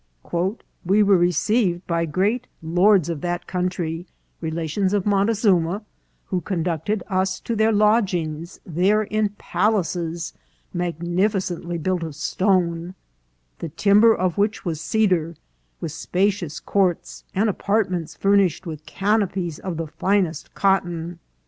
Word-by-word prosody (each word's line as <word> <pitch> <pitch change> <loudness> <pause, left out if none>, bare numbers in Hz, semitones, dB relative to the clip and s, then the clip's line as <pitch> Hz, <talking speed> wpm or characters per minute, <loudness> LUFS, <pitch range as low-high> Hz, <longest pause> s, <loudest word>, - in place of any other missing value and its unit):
" 210 +5 -10
We 200 +4 +4
were 200 -1 +5
received 180 +2 +2
by 170 -1 0
great 205 +10 0 0.2
lords 180 +2 +4
of 165 -4 -3
that 175 0 -2
country, 180 -2 -2 0.3
relations 165 +4 -1
of 205 -3 +1
Montezuma, 200 -2 +2 0.4
who 185 -2 -2
conducted 175 +2 -2
us 190 -1 0
to 235 - -3
our 220 - +4
lodg 210 0 +3
ings 160 +1 -4
there 190 +6 +2
in 215 0 0
palaces 175 -4 -1 0.4
magnificently 175 +1 -1
built 180 +2 -1
of 160 -3 -5
stone, 175 +1 0 0.6
the 165 - -4
timber 200 +8 +5
of 185 +1 -1
which 205 +1 0
was 160 -3 -2
cedar, 180 -6 +1 0.4
with 160 - -4
spacious 180 -1 -1
courts 190 -4 0
and 205 +4 +2
apartments 195 -4 -1
furnished 195 -4 +2
with 155 -2 -7
canopies 195 -4 0
of 180 -4 -4
the 165 - -2
finest 175 +2 -1
cotton. 175 -4 0
180 Hz, 125 wpm, -23 LUFS, 170-200 Hz, 0.6 s, were